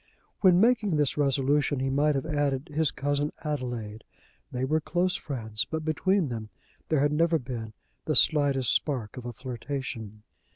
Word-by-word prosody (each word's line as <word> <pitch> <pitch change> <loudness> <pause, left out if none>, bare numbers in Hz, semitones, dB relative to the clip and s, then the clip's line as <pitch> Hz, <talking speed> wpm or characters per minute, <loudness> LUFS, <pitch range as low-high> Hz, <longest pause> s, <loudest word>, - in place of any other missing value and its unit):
When 185 -3 +5
making 220 -5 +3
this 145 -2 +1
resolution 140 0 +1
he 135 0 0
might 145 +2 +2
have 135 - -1
added 145 -1 -1
his 155 -1 +2
cousin 145 +1 -1
Adelaide. 120 -8 -4 0.5
They 125 +1 -1
were 155 +3 +1
close 175 +3 0
friends, 110 -7 -3
but 160 -1 -4
between 175 +1 +1
them 110 -3 -5 0.4
there 155 -3 +2
had 145 +1 +2
never 165 +2 +3
been 120 -5 -6 0.3
the 155 - 0
slightest 140 -5 +4
spark 125 -8 -1
of 125 -1 -7
a - - -3
flirtation. 120 -3 -6
145 Hz, 160 wpm, -28 LUFS, 125-155 Hz, 0.5 s, When